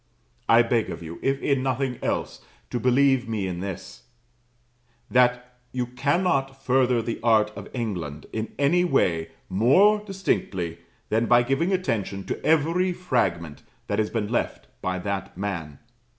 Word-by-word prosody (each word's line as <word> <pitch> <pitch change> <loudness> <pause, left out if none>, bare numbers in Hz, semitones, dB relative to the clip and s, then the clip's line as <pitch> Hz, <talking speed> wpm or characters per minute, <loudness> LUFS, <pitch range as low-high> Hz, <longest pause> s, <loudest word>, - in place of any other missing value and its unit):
I 115 +1 +7
beg 115 -1 0
of - - -6
you, 85 +1 -8
if 135 0 0
in 140 -2 +2
nothing 130 -1 -1
else, - - -2 0.3
to 120 - -1
believe 130 0 +3
me 105 -4 -1
in 90 -2 -4
this, 75 -11 -7 1.1
that 125 0 +2 0.2
you 125 -1 -1
cannot 135 +1 0
further 125 -2 +2
the 115 0 -3
art 110 -2 +3
of 100 0 -8
England 90 - -4
in 110 0 -3
any 160 +6 +3
way 90 - +1 0.2
more 140 - +4
distinctly 95 - -2 0.3
than 115 +2 +1
by 120 +1 +5
giving 135 +9 0
attention 110 - -1
to - - -4
every 165 +4 +2
fragment 95 - -1 0.2
that - - -1
has 105 - +1
been 110 -3 -2
left - - -1 0.2
by 95 0 -1
that 95 -1 -4
man. 85 -8 -4
120 Hz, 150 wpm, -25 LUFS, 100-135 Hz, 1.1 s, I